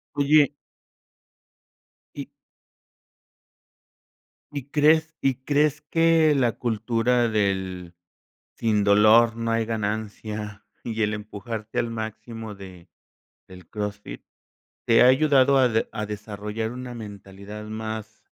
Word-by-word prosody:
Oye 145 0 +4 1.6
Y - - -6 2.2
¿Y 140 -2 -7
crees 155 +2 +3
y 135 -1 +1
crees 150 +1 +1
que 165 0 +3
la 125 -5 +2
cultura 120 +1 0
del 95 -4 -2 0.6
sin 110 -2 +1
dolor 110 +3 +5
no 115 0 -2
hay 115 0 +1
ganancia 105 -1 -4 0.2
y 115 -1 -4
el 105 +1 0
empujarte 105 +1 -6
al 115 - 0
máximo 110 0 -6
de 95 -3 -12 0.6
del 90 -2 -14
CrossFit 105 - -6 0.6
te 115 - +5
ha - - +6
ayudado 135 0 +4
a 125 - +4
de 110 -1 0
a 105 - -4
desarrollar 105 +1 -5
una 125 0 -7
mentalidad 100 -1 -9
más 110 0 -6
110 Hz, 110 wpm, -24 LUFS, 105-125 Hz, 2.2 s, ha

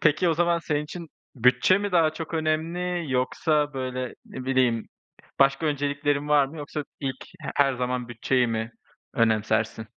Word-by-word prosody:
peki 155 +3 +3
o 165 - +2
zaman 170 +1 +2
senin 150 -3 -1
için 170 +2 -8 0.3
bütçe 125 - +4
mi 205 -2 -3
daha 160 -3 +4
çok 160 +1 -6
önemli 165 +1 -1
yoksa, 145 +3 +1
böyle, 130 -1 -3
ne 130 - -8
bileyim, 130 -3 +1 0.5
başka 135 +4 +3
önceliklerin 145 0 0
var 145 -2 +5
mı? 155 +4 -11
Yoksa 150 0 -5 0.2
ilk 135 -2 -4 0.2
he - - -5
her 135 -2 +4
zaman 125 -1 -2
bütçeyi 125 +2 +1
mi 115 0 -2 0.4
önemsersin? 110 0 +1
145 Hz, 155 wpm, -26 LUFS, 125-155 Hz, 0.5 s, var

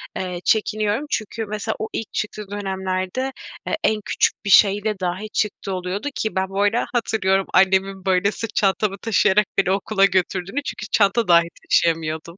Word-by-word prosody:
eee, 180 -1 -4
çekiniyorum. 215 +3 +1
Çünkü 225 -1 -3
mesela 215 +1 -3
o 220 - -3
ilk 225 - -5
çıktığı 210 -1 -4
dönemlerde, 190 +4 -3 0.4
eee, - - 0
en 215 -1 +1
küçük - - 0
bir 200 - -2
şeyle 205 +1 +4
dahi 185 +4 -3
çıktığı 200 -2 -2
oluyordu 185 +6 -3
ki 220 - -2
ben 190 0 0
bu 195 +1 -2
arada 205 +4 +2
hatırlıyorum, 195 -5 +1
annemin, 190 0 +2
böyle, 190 +1 +2
sırt 220 +1 -6
çantamı 195 0 +1
taşıyarak 210 -1 +2
beni 190 -1 +2
okula 195 +1 +2
götürdüğünü 190 +6 -1
çünkü 245 - -5
çanta 210 +2 +3
dahi 170 -1 +5 0.2
taşıyamıyordum. 165 +1 0
195 Hz, 160 wpm, -21 LUFS, 190-215 Hz, 0.4 s, dahi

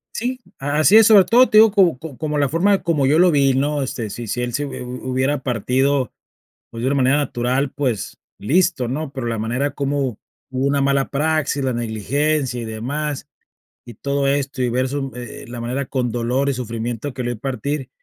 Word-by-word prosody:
Sí, 250 +3 -2 0.2
a 145 +2 -1
así 185 +8 +6
es, 225 - +7
sobre 205 -4 +7
todo 245 +5 +5
te 215 - +4
digo 220 -1 +8
co 180 -9 +3
como 150 -3 -9
como 150 -1 -2
la 140 -1 +2
forma 190 +7 +2
como 150 -6 +1
yo 150 +3 +4
lo 180 +1 +5
vi, 140 -3 +3
¿no? 145 +2 0
Este, 115 -5 -4
si 120 -1 -6
si 125 +4 -2
él 120 -1 -3
se 145 +5 -1
hu 125 -2 -7
hubiera 130 +3 0
partido, 130 +2 0 0.6
pues, 115 - -8
de 130 - +1
una 140 - +1
manera 130 +2 +3
natural, 130 0 -1
pues, 130 -7 -3 0.2
listo, 155 - +1
¿no? 140 +3 -4
Pero 130 -3 -5
la 115 -1 -2
manera 125 +6 -1
como 140 -4 -2 0.3
hubo 130 +1 -1
una 140 0 +1
mala 140 0 +1
praxis, 145 -1 0
la 130 -2 0
negligencia 125 +4 -1
y - - -5
demás, 140 +7 -4 0.6
y 120 - -10
todo 140 +4 -1
esto, 140 -1 -1
y 125 - +2
ver 130 +2 0
su 135 -1 -3
m - - -8 0.2
eh, - - -12
la 120 -1 -6
manera 130 +3 -3
con 125 -4 -2
dolor 125 +4 0
y - - +1
sufrimiento 120 +2 -4
que 125 - -4
lo 120 - -1
vi 120 - -3
partir. 135 +2 -3
135 Hz, 215 wpm, -20 LUFS, 125-145 Hz, 0.6 s, digo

